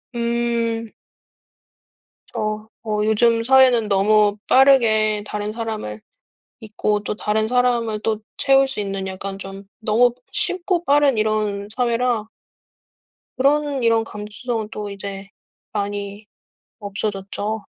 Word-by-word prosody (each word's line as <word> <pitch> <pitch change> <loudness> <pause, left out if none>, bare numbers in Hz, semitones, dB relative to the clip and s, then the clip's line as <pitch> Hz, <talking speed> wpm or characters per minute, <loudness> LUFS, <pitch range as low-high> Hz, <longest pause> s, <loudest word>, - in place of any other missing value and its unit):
음. 235 -1 -1 1.4
그쵸. 215 0 -4
어 215 -2 -1
요즘 230 +1 +3
사회는 255 -3 +5
너무 205 +1 +3
빠르게 220 -6 +4
다른 210 0 -4
사람을 215 - -5 0.6
잊고 210 -1 -1
또 205 - -4
다른 215 +1 0
사람을 240 -3 +1
또 215 -1 -1 0.2
채울 270 -1 +4
수 265 -5 -3
있는 195 -1 -3
약간 195 +1 -5
좀 195 0 -8 0.2
너무 230 +3 +3 0.2
쉽고 360 -1 0
빠른 285 -3 +4
이런 215 -2 0
사회라 240 -2 0 1.1
그런 280 0 +1
이런 230 -1 +3
감수성은 215 +1 -5
또 210 -1 -6
이제 195 0 -7 0.4
많이 205 0 -4 0.5
없어졌죠. 205 +1 -4
215 Hz, 215 characters per minute, -21 LUFS, 205-240 Hz, 1.4 s, 사회는